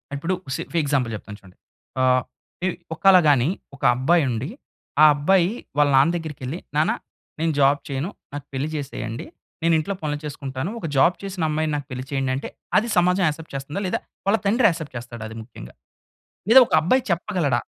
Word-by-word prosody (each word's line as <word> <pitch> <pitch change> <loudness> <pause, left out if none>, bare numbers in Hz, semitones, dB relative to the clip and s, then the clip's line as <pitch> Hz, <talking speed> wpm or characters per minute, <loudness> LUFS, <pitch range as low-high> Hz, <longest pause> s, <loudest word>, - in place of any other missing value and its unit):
ఇప్పుడు 165 +6 -2 0.2
సి 165 - -3
ఫి 170 - -2
ఎగ్జాంపుల్ 135 -5 0
చెప్తాను 105 0 -9
చూడండి. 95 -2 -18 0.4
ఆ! - - +3 0.6
ఇ - - +2 0.3
ఒకాళ 190 +3 +6
గాని 135 -2 +4 0.3
ఒక 140 - -16
అబ్బాయి 155 +6 +3
ఉండి, 120 +7 -3 0.5
ఆ - - +11
అబ్బాయి 175 +5 +3 0.3
వాళ్ళ 145 -1 +4
నాన్న 140 +5 +5
దగ్గరికెళ్లి, 155 -2 -5 0.2
"నాన్న 155 - +3 0.5
నేను 160 0 +1
జాబ్ 140 +1 +4
చేయను, 140 +5 -3 0.2
నాకు 145 -1 -6
పెళ్లి 135 +3 -2
చేసేయండి, 130 -6 -5 0.4
నేను 165 0 +4
ఇంట్లో 200 +6 -2
పనులు 150 -1 -2
చేసుకుంటాను, 140 +2 -4
ఒక - - -6
జాబ్ 170 +7 +5
చేసిన 190 -4 -4
అమ్మాయిని 155 0 -1
నాకు 145 -2 -4
పెళ్లి 130 +1 -5
చేయండి" 135 -1 0
అంటే 135 - -5 0.3
అది 235 - -4
సమాజం 180 +2 +3
యాక్సెప్ట్ 155 0 -5
చేస్తుందా? 145 +8 -4
లేదా - - -1 0.3
వాళ్ళ 215 +3 +3
తండ్రి 225 +3 +4
యాక్సెప్ట్ 160 -5 -5
చేస్తాడ 120 -1 -8
అది 110 - -9
ముఖ్యంగా? 65 - -12 0.8
లేదా 260 - +10
ఒక - - -7
అబ్బాయి 255 +10 +2
చెప్పగలడా? 170 - 0
150 Hz, 175 wpm, -23 LUFS, 135-175 Hz, 0.8 s, ఆ